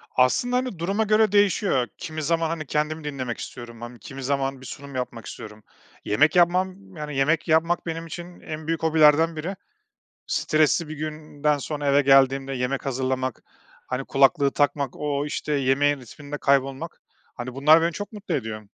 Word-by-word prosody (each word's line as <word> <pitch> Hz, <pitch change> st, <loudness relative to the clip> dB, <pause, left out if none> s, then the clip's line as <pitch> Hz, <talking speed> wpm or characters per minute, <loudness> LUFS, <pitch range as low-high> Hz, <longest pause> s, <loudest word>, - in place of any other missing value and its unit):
Aslında, 130 Hz, -, +3 dB
hani, 250 Hz, -9 st, -3 dB
duruma 195 Hz, +6 st, 0 dB
göre 215 Hz, -1 st, +3 dB
değişiyor. 200 Hz, -, +2 dB
Kimi 155 Hz, -1 st, -5 dB
zaman, 165 Hz, +1 st, +1 dB
hani, 160 Hz, -1 st, -3 dB
kendimi 150 Hz, +2 st, -1 dB
dinlemek 130 Hz, -5 st, -4 dB
istiyorum 120 Hz, -2 st, -8 dB
mım 120 Hz, +1 st, -9 dB
kimi 135 Hz, +2 st, -9 dB
zaman 135 Hz, 0 st, -1 dB
bir -, -, -11 dB
sunum 140 Hz, 0 st, -9 dB
yapmak 125 Hz, -2 st, -4 dB
istiyorum. 105 Hz, 0 st, -9 dB, 0.4 s
Yemek 150 Hz, -, +3 dB
yapmam, 185 Hz, +2 st, +1 dB
yani, 150 Hz, -2 st, -6 dB
yemek 155 Hz, +5 st, +2 dB
yapmak, 165 Hz, +2 st, +2 dB
benim 165 Hz, 0 st, -4 dB
için 175 Hz, +1 st, -9 dB
en 155 Hz, 0 st, -7 dB
büyük 165 Hz, -1 st, -1 dB
hobilerden 160 Hz, 0 st, +5 dB
biri. 170 Hz, +6 st, -4 dB, 0.7 s
Stresli 155 Hz, +1 st, +2 dB
bir 155 Hz, -, -5 dB
günden 150 Hz, -1 st, -2 dB
sonra 145 Hz, +1 st, -4 dB
eve 140 Hz, +1 st, +5 dB
geldiğimde 135 Hz, 0 st, +4 dB
yemek 130 Hz, +2 st, -2 dB
hazırlamak, 130 Hz, -1 st, -2 dB, 0.4 s
hani, 130 Hz, +1 st, -3 dB
kulaklığı 140 Hz, +1 st, +3 dB
takmak, 140 Hz, -2 st, 0 dB
o, 145 Hz, -1 st, -1 dB
işte, 150 Hz, 0 st, -3 dB
yemeğin 140 Hz, +1 st, +2 dB
ritminde 145 Hz, +4 st, -8 dB
kaybolmak, 135 Hz, +4 st, 0 dB, 0.3 s
hani, 125 Hz, 0 st, -6 dB
bunlar 155 Hz, +4 st, +6 dB
beni 170 Hz, +1 st, +1 dB
çok 205 Hz, +6 st, -6 dB
mutlu 205 Hz, -5 st, -4 dB
ediyor. 110 Hz, -6 st, -3 dB
150 Hz, 165 wpm, -24 LUFS, 135-165 Hz, 0.7 s, bunlar